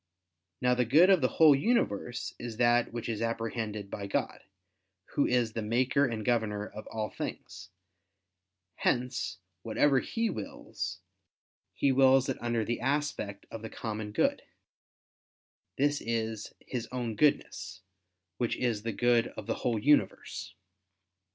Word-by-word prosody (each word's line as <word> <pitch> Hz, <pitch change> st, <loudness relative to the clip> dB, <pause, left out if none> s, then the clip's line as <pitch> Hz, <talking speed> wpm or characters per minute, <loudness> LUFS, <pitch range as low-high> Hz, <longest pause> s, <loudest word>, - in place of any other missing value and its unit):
Now 125 Hz, 0 st, +4 dB
the 125 Hz, 0 st, +2 dB
good 155 Hz, -, +6 dB
of 185 Hz, -5 st, +5 dB
the 130 Hz, -, +4 dB
whole 155 Hz, +1 st, +6 dB
universe 135 Hz, -, 0 dB
is 120 Hz, -2 st, -6 dB
that 120 Hz, 0 st, +3 dB
which 120 Hz, 0 st, -5 dB
is 115 Hz, -2 st, -3 dB
apprehended 115 Hz, -3 st, -3 dB
by 100 Hz, -1 st, -4 dB
God, -, -, -2 dB, 0.7 s
Who 145 Hz, -, +2 dB
is 120 Hz, -3 st, +1 dB
the 115 Hz, -, -2 dB
Maker 130 Hz, +5 st, +2 dB
and 110 Hz, -3 st, -4 dB
Governor 110 Hz, -4 st, 0 dB
of 110 Hz, -, -10 dB
all 110 Hz, -1 st, -3 dB
things: -, -, -7 dB, 1.1 s
hence 125 Hz, -6 st, 0 dB, 0.2 s
whatever 135 Hz, +6 st, +3 dB
He 230 Hz, -, -1 dB
wills, 110 Hz, -, -5 dB, 0.7 s
He 140 Hz, -, +2 dB
wills 135 Hz, 0 st, +5 dB
it 135 Hz, -, -3 dB
under 120 Hz, -2 st, 0 dB
the 120 Hz, -, -2 dB
aspect 135 Hz, -7 st, -2 dB
of 115 Hz, -, -6 dB
the 110 Hz, -, -6 dB
common 110 Hz, -2 st, -5 dB
good; 275 Hz, -, +1 dB, 1.4 s
this 145 Hz, +1 st, +2 dB
is 110 Hz, -2 st, -2 dB
His 120 Hz, -3 st, -4 dB
own 120 Hz, -3 st, -3 dB
Goodness, 145 Hz, -6 st, 0 dB, 0.6 s
which 120 Hz, -2 st, 0 dB
is 120 Hz, -4 st, 0 dB
the 115 Hz, 0 st, -3 dB
good 120 Hz, +1 st, +3 dB
of 110 Hz, -, -6 dB
the -, -, -1 dB
whole 120 Hz, -2 st, +1 dB
universe. 145 Hz, -5 st, +1 dB
120 Hz, 140 wpm, -30 LUFS, 110-130 Hz, 1.4 s, good